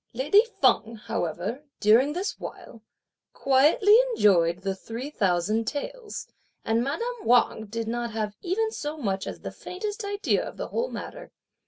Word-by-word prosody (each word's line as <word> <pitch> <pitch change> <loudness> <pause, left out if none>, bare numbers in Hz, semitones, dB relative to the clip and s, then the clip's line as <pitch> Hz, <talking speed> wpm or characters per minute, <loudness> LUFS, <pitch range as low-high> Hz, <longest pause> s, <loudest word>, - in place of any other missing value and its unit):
Lady 295 - +4 0.2
Feng, 225 +1 +3
however, 200 - -3 0.2
during 235 +7 +5
this 370 +5 -3
while, 230 - -9 0.5
quietly 305 - +4 0.2
enjoyed 175 - +3
the 195 -1 -1
three 230 +8 -7
thousand 200 - +1
taels, 455 - -5 0.4
and 225 +1 +2
madame 465 - -2
Wang 235 -2 +3
did 225 +2 -4
not 240 +1 -2
have 215 -2 -3
even 435 +5 0
so 300 -6 -5
much 195 -8 -2
as - - -6
the - - -6
faintest 415 +4 -6
idea 405 +1 0
of - - -8
the - - -5
whole 480 +2 -1
matter. - - -8
245 Hz, 150 wpm, -26 LUFS, -, 0.5 s, during